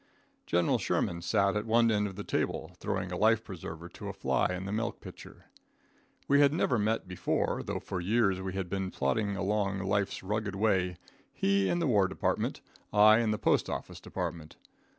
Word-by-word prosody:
General 85 0 +2
Sherman 85 0 -1
sat 100 +3 +2
at 105 +1 -2
one 115 +1 +4
end 105 -1 +1
of 95 - -8
the 100 - -5
table, - - -2
throwing 90 -1 -2
a - - -2
life 110 +2 +3
preserver 85 -3 -8
to - - -9
a - - -4
fly - - +1
in 90 +1 -4
the 100 - -4
milk 115 +2 -2
pitcher. - - -12 0.8
We 140 0 +4
had 140 -1 +6
never 135 -6 +1
met 105 -1 0
before, 90 0 -1
though - - -3
for 90 - -4
years 100 -1 +2
we 95 0 -4
had 95 -1 -3
been 95 +1 -2
plodding 100 +8 -1
along 100 +1 0
life's 100 0 -1
rugged 105 0 -2
way 95 -4 +1 0.3
he 100 0 +1
in - - +1
the 170 - 0
war 105 -8 +3
department, 95 - -1 0.3
I 105 +1 +7
in 115 -2 +1
the 105 - +1
postoffice - - -1
department. 80 -2 -5
100 Hz, 185 wpm, -30 LUFS, 95-110 Hz, 0.8 s, I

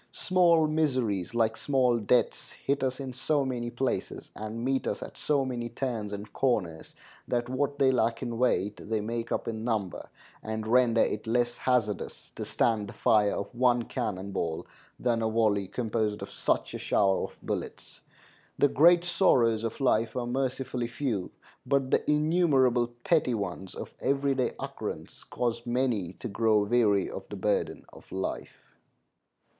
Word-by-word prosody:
Small 170 -3 +3
miseries, 130 - 0
like 110 -1 +2
small 130 -4 +2
debts, 115 +3 +1
hit 140 0 -2
us 130 0 -1
in 135 -2 -5
so 140 +2 0
many 120 -2 -2
places 125 +2 -3
and 110 +2 -5
meet 135 0 0
us - - -2
at - - -10
so 140 -3 +1
many 120 -2 -3
turns 115 -4 -3
and 100 +1 -7
corners, 95 -12 -1 0.3
that 120 -1 0
what 140 +2 -1
they 135 -2 +4
lack 115 -1 +1
in 120 -2 -4
weight 105 -5 +1
they 110 -1 +1
make 115 +2 -4
up - - -1
in 110 -1 -3
number, 110 -6 -2 0.3
and 110 0 -4
render 115 0 +4
it - - -1
less 120 +1 +1
hazardous 115 -6 -1
to - - -6
stand 110 -3 +1
the - - -9
fire 105 -2 +3
of 100 - -5
one 120 -1 +3
cannon 100 -6 -4
ball 80 -4 -2 0.3
than 120 -2 +1
a 110 - +1
volley 105 -3 +2
composed 110 -2 -2
of - - -8
such - - -1
a - - -4
shower 95 -2 +2
of - - -12
bullets. - - -5 0.6
The 145 - +4
great 170 +5 +6
sorrows 125 - +3
of 115 - -3
life 115 -4 +2
are 125 -1 -1
mercifully 130 -1 -2
few, 115 -6 -2 0.3
but 135 0 0
the - - +1
innumerable 150 -6 +3 0.2
petty 150 -8 +2
ones 95 -2 -5
of - - -7
every 140 0 +1
day 130 -3 0
occurrence - - -6
cause 120 -1 -2
many 120 -7 0
to 120 - -7
grow 110 -1 +2
weary 105 -3 +3
of - - -8
the - - -6
burden - - -1
of - - -16
life. 95 0 -5
120 Hz, 165 wpm, -28 LUFS, 110-130 Hz, 0.6 s, great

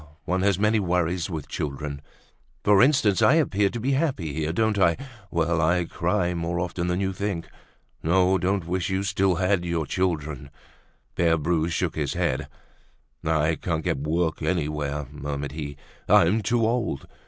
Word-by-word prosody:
one 90 +1 0
has 100 -2 +2
many 105 +2 +3
worries 90 -2 0
with 80 -5 -5
children! 70 0 -4 0.6
For 100 -1 +5
instance, 130 -8 +4
I 145 - +6
appear 105 -11 +2
to 120 - -5
be 130 +5 0
happy 135 - 0
here, 80 +1 -1
don't 110 +3 +1
I? 85 -3 +4 0.3
Well! 85 0 +1
I 85 +2 +2
cry 90 +1 0
more 85 0 -2
often 90 0 -2
than 90 +1 0
you 95 -1 -1
think. 95 -3 -3 0.5
No, 95 +3 +3
don't 95 0 0
wish 90 +2 -1
you 95 0 0
still 95 -1 +1
had 95 0 +1
your 85 -2 -1
children." 75 -6 -2 0.6
Pere 85 -1 +2
Bru 80 +1 0
shook 85 0 -1
his 75 -3 -1
head. - - -1 0.8
"I 80 0 +2
can't 80 0 -2
get - - -1
work 80 +3 -1
anywhere," 75 -4 -1
murmured 70 -1 -4
he. 70 -2 -6 0.3
"I'm 95 +7 +5
too 115 +3 +1
old. 115 - -1
85 Hz, 165 wpm, -25 LUFS, 80-95 Hz, 0.8 s, I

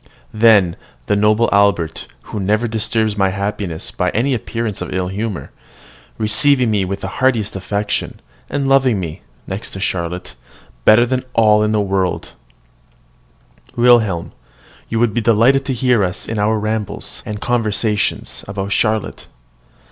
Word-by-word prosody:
then 105 -6 +4 0.3
the 105 - +1
noble 105 +3 +3
Albert, 95 -6 +1 0.2
who 105 - -6
never 105 +4 +1
disturbs 110 -1 -1
my 95 -1 +3
happiness 100 -3 -3
by 90 - -1
any 130 +5 +1
appearance 115 -3 -3
of - - -5
ill 90 -1 -2
humour, 105 0 -4 0.7
receiving 125 +3 +3
me 105 -2 +1
with 95 +1 -4
the 95 - -4
heartiest 115 -6 +1
affection, 100 +2 -3 0.3
and 140 -1 -1
loving 135 -5 +3
me, 80 -4 -6 0.2
next 95 +3 -5
to 95 - -8
Charlotte, 90 -2 -3 0.5
better 120 +3 +6
than 130 +1 -1
all 105 -2 +4
the 110 0 +1
world! 95 -2 -1 1.4
Wilhelm, 115 -8 +3 0.6
you 115 - -1
would 115 -3 +2
be 120 - 0
delighted 120 +5 +3
to 135 - -1
hear 125 -3 +2
us 90 +1 -3
in 110 -2 -3
our 110 +2 +2
rambles, 110 -1 -3
and 105 -1 -6
conversations 110 -3 -1
about 100 0 -4
Charlotte. 110 +1 -1
105 Hz, 140 wpm, -18 LUFS, 100-115 Hz, 1.4 s, better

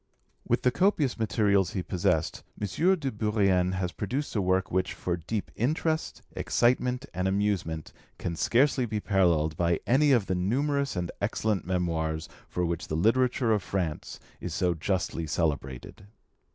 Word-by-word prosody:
With - - +1
the 125 - +4
copious 155 - +1
materials 105 -4 +2
he 95 - -2
possessed, 90 -2 0 0.2
M. 105 - -1 0.3
de 140 -7 -3
Bourrienne 100 -4 +2
has 90 -1 -2
produced 130 +11 -3
a 105 - +2
work 95 -1 +1
which, 95 0 0
for 90 - -2
deep 95 +5 -4
interest, 155 +6 -1
excitement, 125 +2 +1
and 90 +1 -1
amusement, 95 -6 -1 0.2
can 85 - -3
scarcely 130 - +2
be 105 -1 -2
paralleled 85 -7 +2
by 85 -1 +1
any 140 +4 +4
of 120 -7 +4
the 95 - -1
numerous 140 +9 0
and 90 -1 -2
excellent 105 0 0
memoirs 80 -3 -1 0.2
for 90 - -1
which 85 -1 -3
the 80 - -2
literature 120 - +2
of 105 -2 +2
France 90 -5 -3 0.2
is - - -5
so 90 -1 +2
justly 85 -1 -2
celebrated. 75 +2 -3
95 Hz, 150 wpm, -28 LUFS, 85-120 Hz, 0.3 s, the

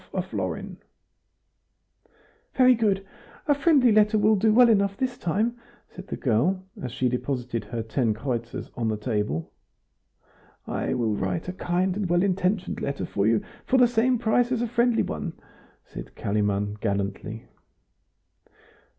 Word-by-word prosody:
1/2 - - 0
florin - - -4 1.8
"Very 255 -1 +6
good; 205 -4 +1 0.4
a 290 - +5
friendly 280 -4 +4
letter 210 0 +4
will 215 +1 +4
do 215 +2 +3
well 245 +3 +7
enough 200 -3 +2
this 255 -2 -1
time," 225 +6 -1 0.3
said 185 +2 -11
the - - -5
girl, 160 - +1 0.2
as 125 - -4
she 125 0 0
deposited 125 -1 -2
her 115 -1 -4
ten 115 +1 0
kreutzers 120 0 -4
on 115 -2 -1
the 110 -1 -1
table. 105 - -2 1.1
"I - - -2
will 115 -4 0
write 95 - -2
a - - -4
kind 180 0 0
and 200 -3 -2
well 175 +1 +3
intentioned 190 0 0
letter 140 0 -2
for 100 0 0
you 110 -1 +2 0.2
for 260 - +2
the 250 -1 +6
same 240 +2 +2
price 240 +2 +1
as 240 -2 0
a - - 0
friendly 240 0 +2
one," 80 -1 -4 0.5
said - - -10
Kalimann, 105 0 -1
gallantly. 100 +1 -3
180 Hz, 150 wpm, -25 LUFS, -, 1.8 s, well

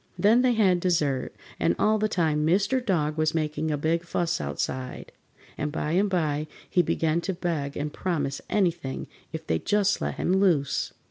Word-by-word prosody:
Then 220 +4 +5
they 250 -1 +3
had 190 -6 +3
dessert, 155 -7 0 0.2
and 85 +1 +2
all 215 0 +3
the 215 - +2
time 155 -6 +1
Mr. 200 +10 +2
Dog 155 -8 0
was 155 0 +1
making 155 0 -1
a 150 - 0
big 165 +3 0
fuss 170 0 -1
outside, 130 -1 -4 0.5
and 150 - -1
by 150 0 -2
and 195 +4 +2
by 155 -4 0 0.2
he 180 - +3
began 165 0 0
to 190 - -2
beg 160 -6 -2
and 150 +1 -3
promise 145 -7 -2
anything 170 -9 0 0.3
if - - -6
they'd 80 0 -1
just 205 -1 +2
let - - -2
him 180 - 0
loose. 180 -8 +2
165 Hz, 180 wpm, -26 LUFS, 150-190 Hz, 0.5 s, Then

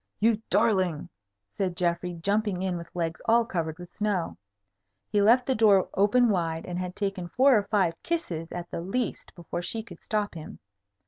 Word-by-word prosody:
"You 225 0 +2
darling!" 185 -6 +2 0.4
said 180 - -2
Geoffrey, 175 0 0
jumping 200 +1 0
in 185 -2 -1
with 170 -1 -7
legs 165 -2 -2
all 230 +1 +4
covered 160 -6 -3
with 175 0 -12
snow. 200 - -1 0.8
He 205 - +3
left 240 +5 +5
the 265 - +1
door 210 -5 +4
open 225 +5 +4
wide, 165 -4 -1
and 180 0 -4
had 180 0 -4
taken 195 -3 -3
four 260 +7 +4
or 205 -2 +1
five 195 -6 +2
kisses 175 - -3
at 175 0 -6
the - - -3
least 200 +6 -3
before 175 0 -5
she 220 +5 -3
could 175 -6 -13
stop 210 -1 -1
him. 160 -2 -9
190 Hz, 180 wpm, -27 LUFS, 175-215 Hz, 0.8 s, left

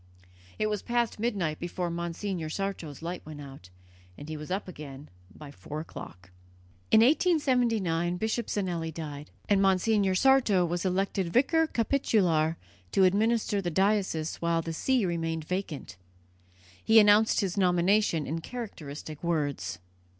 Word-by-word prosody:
It 215 - 0
was 210 -2 -1
past 240 -2 -1
midnight 195 -9 -1
before 175 0 -3
Monsignor 170 0 -3
Sarto's 170 -5 -4
light 175 +1 -5
went 155 -1 -9
out, 135 -10 -11 0.5
and 145 - -9
he 155 - -4
was 150 +1 -8
up 190 +2 -2
again 145 -5 -9 0.2
by 145 +7 -12
four 150 +1 -7
o'clock. 90 - -10 0.6
In 220 - +6
1879 235 - +2
Bishop 220 +3 -1
Zinelli 175 -5 -2
died, 150 -2 -7 0.2
and 200 -1 +3
Monsignor 195 0 +2
Sarto 230 -6 +4
was 175 +2 -2
elected 190 -1 0
vicar 320 - +3
capitular 190 - +1 0.4
to 195 - +4
administer 210 +2 +2
the 175 - -2
diocese 190 -3 0
while 170 -1 0
the 165 - -4
see 250 +6 +1
remained 165 -2 -2
vacant. 155 - -4 0.9
He 220 0 +7
announced 210 +2 +5
his 190 -3 -2
nomination 180 -2 +2
in 165 +3 -3
characteristic 155 - -7
words. 150 - -1
180 Hz, 135 wpm, -28 LUFS, 160-210 Hz, 0.9 s, He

